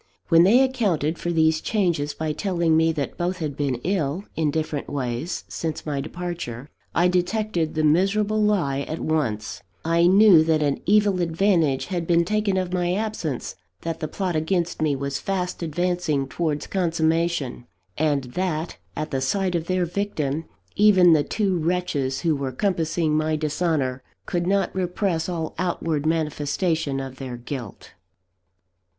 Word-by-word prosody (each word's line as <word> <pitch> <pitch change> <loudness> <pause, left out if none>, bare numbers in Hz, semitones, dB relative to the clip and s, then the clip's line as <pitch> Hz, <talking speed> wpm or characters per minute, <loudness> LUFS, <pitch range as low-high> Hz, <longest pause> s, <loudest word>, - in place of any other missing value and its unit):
When 165 -1 +7
they 225 +9 +6
accounted 195 - 0
for 175 - -2
these 160 -1 +3
changes 170 -9 0
by 155 -1 -2
telling 170 -2 +1
me 160 0 +4
that 145 -3 -4
both 180 +2 -1
had 155 -5 -3
been 140 -3 0
ill, 175 -2 -1
in 160 -2 +1
different 155 -1 -2
ways, 130 +2 -3
since 160 -2 -4
my 145 -3 -2
departure, 150 -6 -6 0.2
I 175 +2 +4
detected 180 -2 0
the 155 - +1
miserable 200 +7 +2
lie 180 -11 +1
at 155 +3 -4
once; 110 -10 -2 0.2
I 170 +1 +4
knew 190 -3 +7
that 160 -1 +2
an 140 -1 0
evil 205 -2 +3
advantage 165 -5 +2
had 170 -2 -2
been 170 -1 +3
taken 210 0 0
of 185 -1 -2
my 175 0 +1
absence; 200 - -3 0.3
that 165 -1 -4
the 155 - -2
plot 185 +1 -2
against 170 +1 -1
me 150 -2 +2
was 140 0 -3
fast 180 -2 -3
advancing 170 -3 -1
towards 150 +1 -2
consummation: 165 -7 0 0.3
and 145 -3 +1
that, 175 -3 -2 0.2
at 155 +1 -4
the 135 -2 -1
sight 185 +7 0
of 170 -1 -2
their 185 -1 +1
victim, 165 -5 -2 0.3
even 190 -4 +6
the 150 -2 +4
two 195 -2 0
wretches 155 -6 -1
who 165 -3 +2
were 140 -2 -3
compassing 165 0 0
my 155 0 +1
dishonour 150 -4 -1 0.2
could 175 0 -1
not 195 -1 +1
repress 180 -2 -1
all 165 -3 -3
outward 165 -4 -1
manifestation 155 -1 0
of 135 -1 -6
their 130 -2 -6
guilt. 120 -3 -7
165 Hz, 155 wpm, -24 LUFS, 150-180 Hz, 0.3 s, When